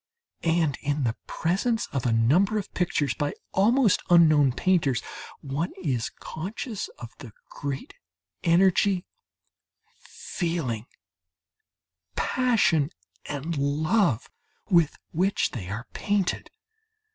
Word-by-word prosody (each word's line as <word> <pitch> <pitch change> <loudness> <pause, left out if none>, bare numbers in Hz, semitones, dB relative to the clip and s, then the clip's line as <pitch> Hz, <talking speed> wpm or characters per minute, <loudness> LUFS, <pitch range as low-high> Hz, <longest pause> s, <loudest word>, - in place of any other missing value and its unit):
And 165 -4 +1
in 145 0 -1
the 115 -2 0
presence 220 +7 0
of 130 -2 -1
a - - +2
number 155 - +3
of 205 - -5
pictures 150 -7 0
by 145 0 -2 0.2
almost 225 +2 +4
unknown 155 -5 +6
painters, 145 - +2 0.4
one 140 +5 -2
is 125 -8 -1
conscious 205 - -6
of 120 -1 -9
the 125 -6 -10 0.2
great 140 -2 -5 0.5
energy, 185 +2 +3 0.9
feeling, 145 - -4 1.3
passion 220 - +2 0.4
and 150 +3 -4
love 150 - +1 0.4
with 170 -4 +4
which 190 +5 +1
they 95 -7 -6
are 110 +4 -5
painted. 205 -3 -1
160 Hz, 100 wpm, -26 LUFS, 135-190 Hz, 1.3 s, unknown